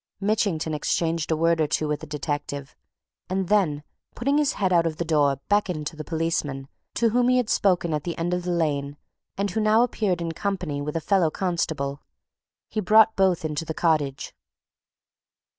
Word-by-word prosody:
Mitchington 195 -6 0
exchanged 165 +2 -1
a 160 - +1
word 165 0 +2
or 155 - +2
two 155 - 0
with 150 -1 -1
the 160 - -9
detective, 145 -1 -4 0.5
and 190 -1 -1
then, 170 -9 +2 0.3
putting 280 +5 +1
his 290 -2 +2
head 190 -2 0
out 170 -1 +4
of 155 -1 -4
the 170 - -2
door 145 -4 +2
beckoned 185 -7 0
to 160 - -5
the 155 - -6
policeman 160 -5 -2 0.3
to 230 - +3
whom 245 +2 +2
he 255 - +4
had 245 -3 0
spoken 175 -4 +2
at 150 -1 -1
the 170 - -4
end 175 +1 -1
of 180 - 0
the 180 - -5
lane 145 -4 -1 0.4
and 200 0 -1
who 220 - -1
now 215 +2 +4
appeared 210 -7 0
in 170 -1 -3
company 180 -5 -3
with 150 +2 -4
a 165 - -1
fellow 185 -2 +2
constable. 155 -6 -2 0.7
He 220 - -3
brought 215 +2 +5
both 185 -4 +2
into 150 0 -2
the 160 -1 -5
cottage. 150 -5 0
165 Hz, 190 wpm, -25 LUFS, 150-195 Hz, 0.7 s, brought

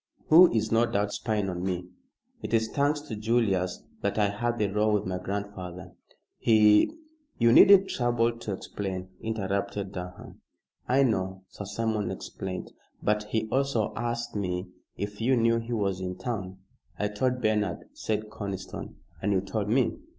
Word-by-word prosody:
"Who 170 +3 +9
is, 110 -1 0
no 115 +1 +4
doubt, 105 -3 0
spying 105 -3 -1
on 90 -2 -3
me. 90 -1 -2 0.6
It - - 0
is 110 0 +1
thanks 145 +3 +1
to 145 -7 -6
Julius 105 -5 0 0.2
that - - -1
I 105 -2 +3
had 120 +4 -1
the 105 - +2
row 105 +2 +1
with 105 -1 +1
my 90 0 -2
grandfather. 95 -2 -5 0.5
He 105 - +5 0.3
" 300 -1 -42
"You 115 -1 +5
needn't 195 +4 +8
trouble 120 -1 +1
to 110 - -5
explain," 95 -1 -5
interrupted 100 -2 -2
Durham. 90 -1 -8 0.5
"I 135 +2 +4
know. 95 -6 -1
Sir 100 - -8
Simon 105 +1 -1
explained. 95 -1 -6 0.3
But 105 0 +1
he 110 +1 -1
also 135 -5 +1
asked 120 0 -3
me 90 -2 -2 0.3
if 105 +2 -5
you 130 +2 +3
knew 115 0 +3
he 115 +1 -5
was 100 -4 -1
in 90 0 -4
town." 100 -7 -4 0.4
"I 105 - 0
told 125 +5 0
Bernard," 105 - 0
said 110 0 -3
Conniston, 100 -3 -6 0.3
"and 105 - +1
you 95 - +3
told 105 +1 -3
me." 125 +2 +2
105 Hz, 165 wpm, -28 LUFS, 95-115 Hz, 0.6 s, Who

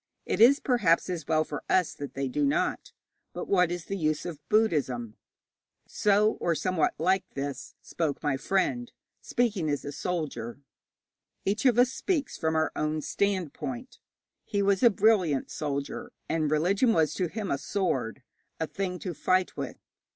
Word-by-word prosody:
It - - -1
is, 270 +5 +8
perhaps, 190 -9 +2
as 165 -5 -4
well 155 -1 +3
for - - -6
us 185 -3 +3
that 145 -3 -8
they 135 0 -1
do 145 +3 -1
not. 140 - 0 0.4
But - - -5
what 180 -3 +3
is 175 -1 -4
the 195 - -3
use 155 -4 0
of 170 -5 -5
Buddhism?' 135 - +1 0.7
So, 210 +1 +2
or 170 -1 +1
somewhat 185 -1 +1
like 185 +4 +2
this, 140 0 -5
spoke 155 -3 -2
my 145 -2 +1
friend, 195 - 0 0.3
speaking 210 -10 0
as 145 -1 -2
a 145 - -4
soldier. 140 -9 -4 0.9
Each 215 +6 +2
of 240 -2 +3
us 250 +1 +5
speaks 315 -1 -1
from 160 -1 -1
our 160 0 +2
own 155 0 -1
standpoint. 205 - -2 0.4
He 200 -2 -1
was 200 -1 +2
a 240 - +8
brilliant 195 -9 +2
soldier, 140 -2 -4 0.2
and 160 -1 0
a - - +1
religion 185 - +3
was 155 -4 +2
to 180 - -1
him 205 +2 -4
a 140 - 0
sword, 135 - -2 0.4
a 160 - 0
thing 185 +2 -3
to 180 - -4
fight 185 +3 +1
with. - - -5
175 Hz, 165 wpm, -28 LUFS, 150-200 Hz, 0.9 s, is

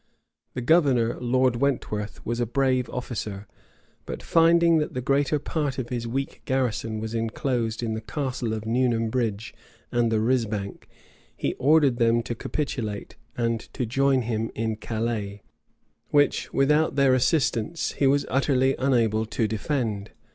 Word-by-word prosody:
The 125 - -2
governor, 130 -5 +3
Lord 125 0 +2
Wentworth, 110 -6 -2
was 120 +1 -2
a 120 - 0
brave 130 +1 +1
officer; 105 -5 -5 0.6
but - - -6
finding 170 0 +4
that 150 - -3
the - - -1
greater 140 +3 +1
part 145 -2 -2
of 125 -3 -4
his 120 -2 -3
weak 135 +4 -3
garrison 115 -5 -1
was 110 +1 -5
enclosed 115 0 -1
in 110 -1 -1
the 110 - -4
castle 125 0 -3
of 110 0 -6
Newnam 115 -1 +1
Bridge 115 -3 -2 0.4
and 120 -1 +1
the 110 - +2
risbank, 110 -4 -1 0.5
he - - -1
ordered 145 -3 +4
them 115 0 +3
to 120 - -3
capitulate, 115 -5 -4 0.2
and 115 -1 0 0.2
to 125 - -1
join 135 +2 +2
him 115 -1 -2
in 110 0 -1
Calais, 110 -2 -3 0.7
which, 145 -1 +2
without 150 +3 +2
their 140 -2 +4
assistance, 135 +2 +1
he 140 - +1
was 140 +1 +3
utterly 135 0 +2
unable 115 -5 +2
to 110 0 0
defend. 110 -2 -2
120 Hz, 145 wpm, -25 LUFS, 110-135 Hz, 0.7 s, finding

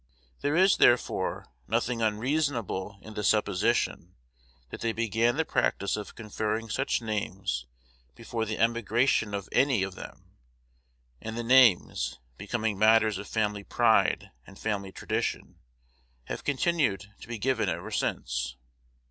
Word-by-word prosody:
There 145 +2 0
is, 190 +2 +5
therefore, 120 0 +2 0.2
nothing 120 -1 0
unreasonable 110 -4 -1
in 110 - -10
the 105 - -4
supposition 105 -3 +1 0.6
that - - -7
they 115 -1 0
began 115 +3 +1
the 160 - +1
practice 100 -8 0
of 105 -1 -7
conferring 110 0 -3
such 135 -1 0
names 95 - -3 0.5
before 115 -1 -3
the 110 0 -3
emigration 115 -1 +1
of 100 -1 -5
any 130 -7 +3
of 95 -1 -4
them; - - -11 0.9
and 110 +1 -5
the 120 - -2
names, 120 -6 +4 0.2
becoming 110 - -2
matters 110 -1 +4
of 100 - -7
family 105 -2 -1
pride 115 +1 +2 0.2
and 100 - -13
family 100 -3 -3
tradition, - - -3 0.6
have - - -6
continued 140 - +1
to - - -11
be 120 -1 -4
given 115 -2 0
ever 85 0 -4
since. - - -2
110 Hz, 130 wpm, -28 LUFS, 100-120 Hz, 0.9 s, is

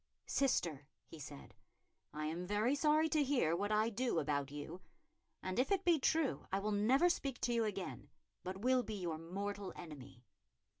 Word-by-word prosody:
"Sister," 165 - 0 0.2
he 165 - -11
said, 145 0 -9 0.6
"I 150 0 -4
am 170 +3 -3
very 210 +6 +2
sorry 305 +2 +4
to 305 -1 +3
hear 255 - +2
what 205 +4 -1
I 215 +2 +3
do 240 -2 0
about 145 -3 0
you; 150 +5 -7 0.6
and 185 +4 -2
if 260 - +2
it 390 -1 +2
be 340 -3 +5
true, 315 +1 +1
I 190 - +2
will 210 +2 -1
never 240 +11 +4
speak 275 -7 -1
to 240 - +1
you 230 -1 +2
again, 200 -3 -4 0.3
but 185 +1 -4
will 255 +2 +4
be 220 -3 -5
your 170 -5 -3
mortal 200 +4 -4
enemy." 140 -7 -10
205 Hz, 180 wpm, -37 LUFS, 165-260 Hz, 0.6 s, be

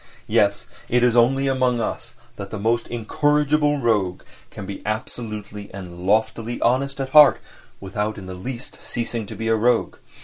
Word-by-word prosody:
Yes, - - +2 0.2
it 125 +1 +3
is 120 -1 +3
only 135 +3 +4
among 130 -2 +1
us 110 - -4 0.2
that 100 -1 -7
the 110 - -5
most 115 +3 0
incorrigible 145 +5 +1
rogue 105 -8 0 0.3
can - - -8
be 100 0 -7
absolutely 105 -2 -5
and 90 -2 -8
loftily 110 +3 +1
honest 135 +3 +1
at 135 -1 -2
heart 150 0 +7 0.4
without 105 +2 -3
in 95 - -8
the 95 - -7
least 120 +7 -8
ceasing 115 -2 -4
to - - -8
be 115 - -4
a 115 - +3
rogue. 120 +2 +1
115 Hz, 165 wpm, -22 LUFS, 105-130 Hz, 0.4 s, heart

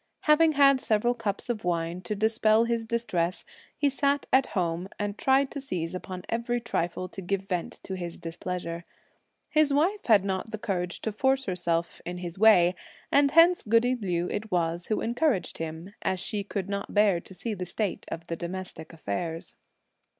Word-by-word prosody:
Having 315 +1 +5
had 275 -2 +5
several 225 +3 +2
cups 220 -4 -3
of 235 -3 -2
wine 170 0 -1
to 200 +4 -3
dispel 220 +1 +3
his 235 -1 -1
distress, 185 -7 -1 0.3
he 290 - +2
sat 280 +1 +1
at 265 0 +5
home 175 +1 -1
and 205 -1 -2
tried 270 +3 +2
to 280 - -5
seize 175 -11 -3
upon 185 0 -6
every 235 +1 -1
trifle 185 -6 -2
to 195 - -8
give 195 +1 -2
vent 180 -3 -3
to 190 - -5
his 175 -2 -5
displeasure. 170 0 -5 0.6
His 305 -2 +3
wife 350 +9 +2
had 210 -4 +5
not 190 +2 -2
the 220 - -4
courage 180 -4 -3
to 220 - -2
force 265 +5 +1
herself 170 -3 -1
in 180 +1 -5
his 175 0 -6
way, 185 -5 +6 0.4
and 280 0 +5
hence 335 +4 +6
goody 230 +3 +3
Liu 180 -7 -1
it 215 +1 -3
was 170 -1 0
who 215 - 0
encouraged 240 - 0
him, 165 +4 -6
as 185 - -1
she 205 +2 -2
could 195 -1 -4
not 200 +1 -4
bear 205 -4 +4
to 190 - -13
see 225 +3 -3
the 180 -3 -5
state 205 +2 -2
of 165 0 -5
the 165 - -3
domestic 175 -1 -6
affairs. 160 - -4
200 Hz, 180 wpm, -27 LUFS, 175-235 Hz, 0.6 s, way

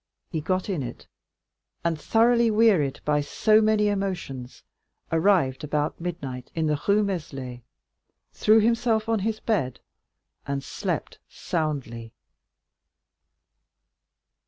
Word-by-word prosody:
He 160 -4 -2
got 185 +3 -1
in 185 -8 -1
it, 125 - -7 0.8
and 165 -2 -1
thoroughly 235 +1 +4
wearied 210 -11 +3
by 150 -1 +2
so 215 +8 +3
many 215 -1 +3
emotions, 180 -11 -3 0.5
arrived 165 -6 +2
about 150 +1 -2
midnight 135 -8 -5
in 160 -1 0
the 150 -1 0
Rue 205 +1 +4
Meslay, 135 -10 -4 0.7
threw 215 +1 +5
himself 225 0 +2
on 225 -1 +1
his 215 +2 -2
bed 140 - -1 0.7
and 140 -1 -2
slept - - -4
soundly. 135 -8 -3
170 Hz, 110 wpm, -25 LUFS, 140-215 Hz, 0.8 s, threw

